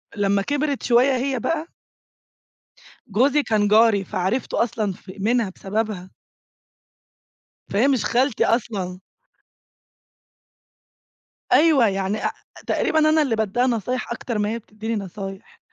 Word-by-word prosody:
لمّا 200 Hz, -1 st, +1 dB
كبرت 285 Hz, +4 st, -1 dB
شوية 255 Hz, +3 st, +4 dB
هي 260 Hz, 0 st, -1 dB
بقى 320 Hz, +7 st, -2 dB, 1.4 s
جوزي 265 Hz, +8 st, +2 dB
كان 215 Hz, -4 st, +1 dB
جاري، 215 Hz, -1 st, +4 dB
فعرِفته 195 Hz, +8 st, -1 dB
أصلًا 220 Hz, -3 st, -2 dB
في 185 Hz, +2 st, -13 dB
منها 225 Hz, 0 st, +1 dB
بسببها. 200 Hz, -2 st, -3 dB, 1.6 s
فهي 225 Hz, +7 st, +3 dB
مش 265 Hz, -5 st, +1 dB
خالتي 255 Hz, 0 st, +2 dB
أصلًا. 195 Hz, -6 st, -1 dB, 2.5 s
أيوه 295 Hz, -7 st, +5 dB
يعني 195 Hz, +1 st, -1 dB
أ -, -, +4 dB
أ -, -, -2 dB, 0.4 s
تقريبًا 315 Hz, -, +1 dB
أنا 310 Hz, 0 st, +4 dB
اللي 260 Hz, -7 st, +1 dB
بادّيها 220 Hz, +4 st, 0 dB
نصايح 245 Hz, +1 st, -2 dB
أكتر 235 Hz, -1 st, -4 dB
ما 210 Hz, 0 st, 0 dB
هي 230 Hz, -, -3 dB
بتدّيني 220 Hz, +1 st, -5 dB
نصايح. 195 Hz, 0 st, -7 dB
225 Hz, 120 wpm, -22 LUFS, 200-255 Hz, 2.5 s, أيوه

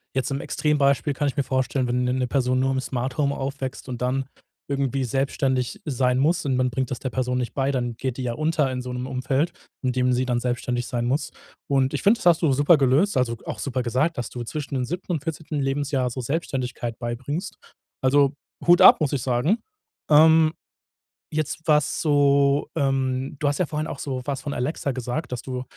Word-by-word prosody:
jetzt 130 Hz, +1 st, -1 dB
im 135 Hz, -, -1 dB
Extrembeispiel 145 Hz, -1 st, +1 dB
kann 145 Hz, +2 st, -1 dB
ich 140 Hz, -, -2 dB
mir 140 Hz, -, +1 dB
vorstellen, 130 Hz, 0 st, 0 dB
wenn 125 Hz, +1 st, 0 dB
'ne 125 Hz, 0 st, +1 dB
'ne 130 Hz, -1 st, 0 dB
Person 130 Hz, -1 st, +1 dB
nur 135 Hz, +1 st, +1 dB
im 130 Hz, -, 0 dB
Smart-Home 130 Hz, +2 st, -1 dB
aufwächst 135 Hz, -1 st, -5 dB
und 125 Hz, -1 st, -5 dB
dann 130 Hz, +2 st, 0 dB, 0.4 s
irgendwie 135 Hz, -1 st, 0 dB
selbstständig 130 Hz, 0 st, -1 dB
sein 125 Hz, -3 st, +1 dB
muss 155 Hz, +5 st, +2 dB
und 135 Hz, -2 st, +1 dB
man 130 Hz, 0 st, +2 dB
bringt 130 Hz, +2 st, -2 dB
das 130 Hz, -, -3 dB
der 130 Hz, -, -3 dB
Person 125 Hz, 0 st, -1 dB
nicht 120 Hz, -2 st, -3 dB
bei, 135 Hz, 0 st, 0 dB
dann 120 Hz, -3 st, -2 dB
geht 130 Hz, -2 st, -3 dB
die 130 Hz, -, -4 dB
ja 120 Hz, -, -1 dB
unter 155 Hz, 0 st, +1 dB
in 125 Hz, 0 st, -3 dB
so 125 Hz, 0 st, -6 dB
'nem 125 Hz, +1 st, -4 dB
Umfeld, 130 Hz, +4 st, 0 dB, 0.3 s
in 130 Hz, -, +1 dB
dem 125 Hz, 0 st, +1 dB
sie 125 Hz, +1 st, +1 dB
dann 125 Hz, -1 st, 0 dB
selbstständig 120 Hz, 0 st, -2 dB
sein 120 Hz, -3 st, -2 dB
muss. 135 Hz, +6 st, -1 dB, 0.4 s
Und 135 Hz, 0 st, +2 dB
ich 145 Hz, -, -2 dB
finde, 220 Hz, +4 st, +4 dB
das -, -, -9 dB
hast 170 Hz, -2 st, +5 dB
du 155 Hz, -5 st, +3 dB
super 145 Hz, +5 st, +5 dB
gelöst 140 Hz, +6 st, +3 dB
also 120 Hz, -2 st, +1 dB
auch -, -, -5 dB
super 130 Hz, -3 st, -2 dB
gesagt, 130 Hz, +7 st, 0 dB
dass 120 Hz, -, -3 dB
du 120 Hz, -1 st, -6 dB
zwischen 145 Hz, +3 st, -5 dB
dem 130 Hz, -1 st, 0 dB
7. 180 Hz, +6 st, -5 dB
und 155 Hz, -5 st, -2 dB
14. 160 Hz, -2 st, -4 dB
Lebensjahr 135 Hz, -1 st, 0 dB
so 130 Hz, +2 st, -5 dB
Selbstständigkeit 125 Hz, -4 st, -3 dB
beibringst. 130 Hz, +10 st, -4 dB, 0.4 s
Also, 140 Hz, +1 st, +4 dB, 0.3 s
Hut 175 Hz, +1 st, +6 dB
ab, -, -, +9 dB
muss 145 Hz, -, +1 dB
ich 140 Hz, -, -1 dB
sagen. 130 Hz, -, +1 dB, 0.5 s
Ähm, 160 Hz, +1 st, +6 dB, 0.8 s
jetzt 155 Hz, +1 st, -2 dB
was 150 Hz, -2 st, +2 dB
so, 140 Hz, -1 st, +3 dB
ähm 135 Hz, -2 st, 0 dB
du 150 Hz, -, 0 dB
hast 145 Hz, -, 0 dB
ja 180 Hz, -, +2 dB
vorhin 155 Hz, 0 st, -3 dB
auch 135 Hz, -, -6 dB
so 130 Hz, -3 st, -3 dB
was 140 Hz, -2 st, -3 dB
von 145 Hz, -, -4 dB
Alexa 140 Hz, +2 st, -2 dB
gesagt, 130 Hz, +3 st, -4 dB
dass 125 Hz, -2 st, -3 dB
du 125 Hz, -1 st, -4 dB
135 Hz, 210 wpm, -24 LUFS, 125-145 Hz, 0.8 s, ab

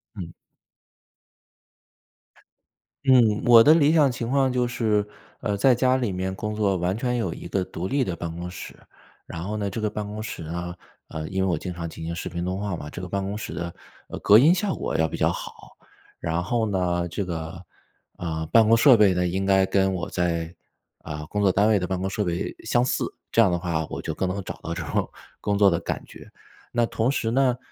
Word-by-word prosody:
嗯。 85 Hz, -5 st, -7 dB, 2.7 s
嗯， 120 Hz, -5 st, +4 dB
我 115 Hz, -1 st, +8 dB
的 155 Hz, -, +7 dB
理 155 Hz, -1 st, +4 dB
想 145 Hz, -5 st, +4 dB
情 120 Hz, -1 st, -4 dB
况 135 Hz, 0 st, +2 dB
就 125 Hz, -1 st, +1 dB
是， 105 Hz, -4 st, 0 dB, 0.3 s
呃， 105 Hz, -3 st, -1 dB
在 125 Hz, +5 st, +4 dB
家 130 Hz, +1 st, +3 dB
里 120 Hz, -6 st, -1 dB
面 95 Hz, +1 st, -3 dB
工 105 Hz, +1 st, -4 dB
作 100 Hz, -3 st, +1 dB
完 90 Hz, +4 st, -1 dB
全 125 Hz, 0 st, -1 dB
有 95 Hz, -8 st, -1 dB
一 -, -, -9 dB
个 95 Hz, -, -1 dB
独 90 Hz, 0 st, -5 dB
立 140 Hz, +3 st, +1 dB
的 90 Hz, -7 st, -3 dB
办 85 Hz, 0 st, -5 dB
公 90 Hz, +1 st, -5 dB
室， 90 Hz, -, -9 dB, 0.5 s
然 80 Hz, +1 st, -6 dB
后 105 Hz, +3 st, -3 dB
呢， 100 Hz, -2 st, -2 dB
这 100 Hz, -, -5 dB
个 110 Hz, -1 st, 0 dB
办 105 Hz, 0 st, -4 dB
公 105 Hz, +1 st, -6 dB
室 110 Hz, -, -6 dB
呢， 85 Hz, +2 st, -5 dB, 0.3 s
呃， 80 Hz, -1 st, -5 dB
因 95 Hz, 0 st, -1 dB
为 -, -, +1 dB
我 85 Hz, -, +1 dB
经 90 Hz, +2 st, -5 dB
常 85 Hz, -1 st, -5 dB
进 80 Hz, -, -9 dB
行 85 Hz, +1 st, -3 dB
视 -, -, -5 dB
频 85 Hz, 0 st, -4 dB
通 90 Hz, +2 st, -2 dB
话 100 Hz, -3 st, -2 dB
嘛， 75 Hz, -3 st, -7 dB
这 90 Hz, -, -7 dB
个 90 Hz, -, -5 dB
办 100 Hz, +2 st, -2 dB
公 100 Hz, +2 st, -3 dB
室 90 Hz, -, -6 dB
的， 85 Hz, +1 st, -5 dB, 0.4 s
呃， -, -, -6 dB
隔 105 Hz, -, +7 dB
音 155 Hz, +7 st, +6 dB
效 190 Hz, +1 st, -1 dB
果 -, -, -2 dB
要 80 Hz, 0 st, +2 dB
比 -, -, -6 dB
较 -, -, +2 dB
好。 -, -, -9 dB, 0.4 s
然 85 Hz, +1 st, -1 dB
后 115 Hz, +3 st, 0 dB
呢， 90 Hz, -4 st, 0 dB
这 100 Hz, +4 st, -3 dB
个， 85 Hz, 0 st, -6 dB, 0.5 s
啊， 80 Hz, -2 st, -3 dB
办 115 Hz, -2 st, +6 dB
公 115 Hz, -, +6 dB
设 120 Hz, +1 st, +7 dB
备 100 Hz, -3 st, +5 dB
呢， 90 Hz, 0 st, 0 dB
应 95 Hz, +2 st, -1 dB
该 95 Hz, -1 st, +4 dB
跟 95 Hz, 0 st, +2 dB
我 85 Hz, -2 st, -4 dB
在 85 Hz, -1 st, -1 dB, 0.4 s
啊， 75 Hz, -1 st, -7 dB
工 105 Hz, -, -1 dB
作 95 Hz, -, +5 dB
单 100 Hz, +4 st, +3 dB
位 110 Hz, -, +4 dB
的 90 Hz, -, -2 dB
办 95 Hz, -1 st, -2 dB
公 95 Hz, +1 st, -2 dB
设 105 Hz, +1 st, -2 dB
备 85 Hz, -1 st, -2 dB
相 120 Hz, -, +2 dB
似， 125 Hz, -, 0 dB, 0.3 s
这 -, -, +1 dB
样 105 Hz, -5 st, +6 dB
的 85 Hz, -, 0 dB
话 85 Hz, -3 st, -1 dB
我 -, -, -4 dB
就 -, -, -4 dB
更 95 Hz, -, -1 dB
能 95 Hz, +1 st, -3 dB
找 -, -, -6 dB
到 85 Hz, -, -3 dB
这 85 Hz, -1 st, -4 dB
种 -, -, -1 dB, 0.3 s
工 100 Hz, -, -1 dB
作 100 Hz, -1 st, +6 dB
的 85 Hz, -, 0 dB
感 -, -, -4 dB
觉。 -, -, -13 dB, 0.4 s
那 120 Hz, -1 st, +2 dB
同 115 Hz, +3 st, 0 dB
时 115 Hz, -4 st, -1 dB
呢， 125 Hz, 0 st, +2 dB
95 Hz, 245 characters per minute, -24 LUFS, 85-115 Hz, 2.7 s, 我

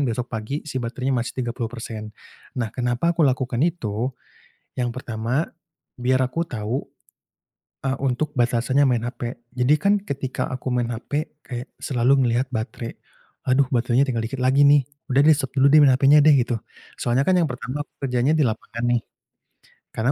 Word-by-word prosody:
besok 120 Hz, +2 st, -2 dB
pagi 110 Hz, +6 st, -3 dB
si 135 Hz, -, -5 dB
baterainya 130 Hz, +3 st, -2 dB
masih 120 Hz, 0 st, -2 dB
30%. 115 Hz, -2 st, -5 dB, 0.5 s
Nah, 115 Hz, -2 st, -1 dB
kenapa 125 Hz, +6 st, 0 dB
aku 170 Hz, -, -3 dB
lakukan 130 Hz, -2 st, 0 dB
itu? 125 Hz, -, -1 dB, 0.7 s
Yang 120 Hz, -1 st, 0 dB
pertama 125 Hz, +4 st, -2 dB, 0.5 s
biar 130 Hz, +1 st, +2 dB
aku 165 Hz, +7 st, -2 dB
tahu, 115 Hz, +3 st, -3 dB, 1.0 s
e 135 Hz, -, 0 dB
untuk 135 Hz, +3 st, -1 dB
batasannya 120 Hz, +3 st, +2 dB
main 120 Hz, -2 st, +1 dB
HP, 120 Hz, -2 st, -5 dB, 0.2 s
jadi 125 Hz, +4 st, +4 dB
kan 200 Hz, +1 st, +4 dB
ketika 130 Hz, -4 st, -3 dB
aku 130 Hz, 0 st, -4 dB
main 120 Hz, -1 st, 0 dB
HP 145 Hz, +6 st, -4 dB
kayak 125 Hz, +1 st, -6 dB
selalu 125 Hz, 0 st, +2 dB
melihat 120 Hz, +1 st, +1 dB
baterai, 115 Hz, +1 st, -4 dB, 0.6 s
"Aduh 135 Hz, +2 st, +4 dB
baterainya 125 Hz, +2 st, +3 dB
tinggal 120 Hz, -3 st, -1 dB
dikit 125 Hz, +4 st, -4 dB
lagi 130 Hz, +2 st, +3 dB
nih, 145 Hz, -1 st, +6 dB, 0.3 s
udah 135 Hz, +2 st, +5 dB
di 155 Hz, -, +8 dB
stop 135 Hz, -3 st, -3 dB
dulu 135 Hz, +1 st, +6 dB
deh 155 Hz, -, +8 dB
main 140 Hz, -, +7 dB
HP-nya 140 Hz, +3 st, +6 dB
deh," 155 Hz, +1 st, +6 dB
gitu. 120 Hz, -2 st, 0 dB, 0.4 s
Soalnya 125 Hz, +3 st, +1 dB
kan 185 Hz, -, +3 dB
yang 160 Hz, -, 0 dB
pertama 125 Hz, +3 st, -4 dB
aku -, -, -40 dB
kerjanya 125 Hz, +3 st, +1 dB
di 150 Hz, -, +3 dB
lapangan 115 Hz, +1 st, -4 dB
nih, 120 Hz, -1 st, +2 dB, 0.9 s
karena 120 Hz, +4 st, +1 dB
125 Hz, 165 wpm, -23 LUFS, 120-140 Hz, 1.0 s, di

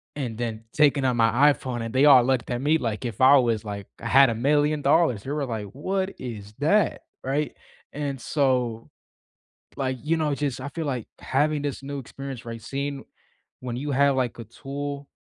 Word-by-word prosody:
and 120 Hz, -6 st, -4 dB
then 115 Hz, -2 st, -4 dB
taking 145 Hz, -2 st, +3 dB
out 125 Hz, -2 st, +2 dB
my 120 Hz, +6 st, +5 dB
iPhone 125 Hz, -4 st, -5 dB
and 115 Hz, 0 st, -5 dB
they 130 Hz, +2 st, +4 dB
all 135 Hz, -4 st, +8 dB
looked 130 Hz, -2 st, 0 dB
at 120 Hz, 0 st, -2 dB
me, 150 Hz, +3 st, +3 dB
like, 115 Hz, -5 st, -3 dB
if 115 Hz, -4 st, -5 dB
I 130 Hz, +2 st, +7 dB
was 115 Hz, -4 st, +1 dB
like 100 Hz, -1 st, -5 dB, 0.2 s
I -, -, -4 dB
had 135 Hz, -1 st, +6 dB
a -, -, 0 dB
million 145 Hz, +4 st, +2 dB
dollars. 140 Hz, -7 st, +3 dB
They 135 Hz, -, -5 dB
were 145 Hz, -2 st, -1 dB
like, 110 Hz, -4 st, -4 dB
"What 190 Hz, +7 st, -2 dB
is 110 Hz, -5 st, -7 dB
that?" 200 Hz, +8 st, +2 dB, 0.2 s
Right, 140 Hz, +1 st, -1 dB, 0.4 s
and 140 Hz, -2 st, -3 dB
so 125 Hz, -6 st, 0 dB, 0.9 s
like, 130 Hz, -1 st, -1 dB
you 160 Hz, +2 st, +1 dB
know, 150 Hz, -3 st, 0 dB
just 140 Hz, -2 st, -3 dB
I 135 Hz, -, -5 dB
feel 165 Hz, +2 st, -4 dB
like 125 Hz, -5 st, -3 dB
having 150 Hz, +2 st, 0 dB
this 140 Hz, -2 st, -4 dB
new 140 Hz, +1 st, -5 dB
experience, 135 Hz, -1 st, -8 dB
right? 115 Hz, -1 st, -7 dB
Seeing 140 Hz, +3 st, -4 dB, 0.6 s
when 120 Hz, -1 st, -5 dB
you 145 Hz, +3 st, -3 dB
have, 140 Hz, +1 st, +3 dB
like, 125 Hz, -2 st, -1 dB
a 115 Hz, -, -6 dB
tool, 140 Hz, +4 st, -6 dB
135 Hz, 195 wpm, -25 LUFS, 120-145 Hz, 0.9 s, all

